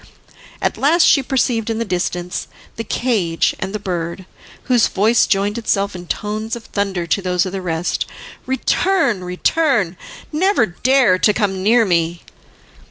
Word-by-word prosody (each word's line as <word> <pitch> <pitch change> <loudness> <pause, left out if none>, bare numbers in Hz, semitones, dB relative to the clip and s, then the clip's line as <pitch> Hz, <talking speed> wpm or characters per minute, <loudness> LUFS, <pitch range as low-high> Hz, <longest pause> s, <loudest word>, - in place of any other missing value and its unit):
At - - -1
last 320 +5 +4
she 280 - +5
perceived 245 -4 0
in 225 - -1
the 230 - -2
distance 180 -1 -3 0.3
the 225 - -4
cage 205 -8 0
and 190 - -3
the 215 - -2
bird, 180 -2 -4 0.4
whose 245 -3 +3
voice 215 +4 +2
joined 205 +2 0
itself 200 -3 -1
in 175 -1 -9
tones 215 +3 -3
of 235 - -9
thunder 195 -4 -2
to 170 +4 0
those 180 -1 0
of 185 - -4
the 195 0 -4
rest: 170 -1 -2 0.4
"Return, 265 - +1
return! 190 - 0 0.3
never 365 - +2
dare 240 0 +2
to 210 - +3
come 195 -4 -1
near 225 +4 +4
me." 170 -2 0
205 Hz, 155 wpm, -18 LUFS, 180-235 Hz, 0.4 s, she